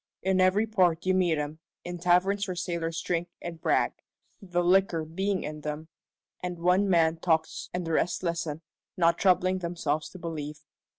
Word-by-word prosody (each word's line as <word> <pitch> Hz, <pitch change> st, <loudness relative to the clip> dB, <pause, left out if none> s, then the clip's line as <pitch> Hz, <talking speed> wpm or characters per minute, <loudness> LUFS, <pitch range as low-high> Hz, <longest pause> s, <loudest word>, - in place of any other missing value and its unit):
In 190 Hz, 0 st, +2 dB
every 190 Hz, +4 st, +4 dB
port 180 Hz, -6 st, +2 dB
you 185 Hz, -, +3 dB
meet 180 Hz, -4 st, +2 dB
'em, 150 Hz, +1 st, -4 dB, 0.2 s
in 175 Hz, 0 st, -6 dB
taverns 185 Hz, +4 st, +2 dB
where 185 Hz, -, -3 dB
sailors 170 Hz, -2 st, -2 dB
drink 175 Hz, 0 st, -1 dB
and 165 Hz, -2 st, -7 dB
brag -, -, +2 dB, 0.5 s
the 175 Hz, -3 st, -1 dB
liquor 180 Hz, -3 st, +3 dB
being 190 Hz, +4 st, -1 dB
in 150 Hz, 0 st, -6 dB
them 150 Hz, +2 st, -5 dB, 0.5 s
and 180 Hz, -1 st, -4 dB
one 180 Hz, +4 st, +3 dB
man 165 Hz, -2 st, +3 dB
talks 160 Hz, -1 st, 0 dB
and 180 Hz, -1 st, -3 dB
the 165 Hz, -, -3 dB
rest 175 Hz, +3 st, 0 dB
listen, 165 Hz, -2 st, -2 dB, 0.3 s
not 170 Hz, -1 st, +3 dB
troubling 185 Hz, 0 st, +3 dB
themselves 165 Hz, -4 st, -2 dB
to -, -, -11 dB
believe. 150 Hz, -3 st, -6 dB
175 Hz, 170 wpm, -28 LUFS, 160-185 Hz, 0.5 s, every